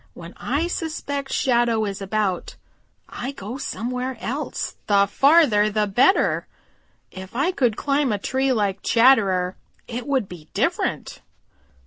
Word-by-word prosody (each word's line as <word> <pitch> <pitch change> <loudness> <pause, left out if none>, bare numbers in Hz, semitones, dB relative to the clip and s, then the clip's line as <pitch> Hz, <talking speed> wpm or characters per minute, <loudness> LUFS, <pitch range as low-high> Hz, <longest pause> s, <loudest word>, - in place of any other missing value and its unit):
When 170 0 -10
I 285 +6 -1
suspect 285 -5 -4
Shadow 235 -3 +2
is 200 -1 -5
about, 195 -2 -2 0.5
I 265 +3 -6
go 235 +2 -7
somewhere 250 +2 -4
else, 275 +5 -4
the 200 -1 +4
farther 240 -2 +4
the 210 0 +1
better. 250 - +2 0.6
If 190 +4 -10
I 285 +8 +1
could 245 - 0
climb 280 -2 +1
a 205 - 0
tree 265 +6 0
like 200 -5 0
Chatterer, 200 -7 +3 0.3
it 245 +2 -6
would 265 -7 0
be 165 -4 -12
different." - - -1
235 Hz, 130 wpm, -23 LUFS, 200-270 Hz, 0.6 s, the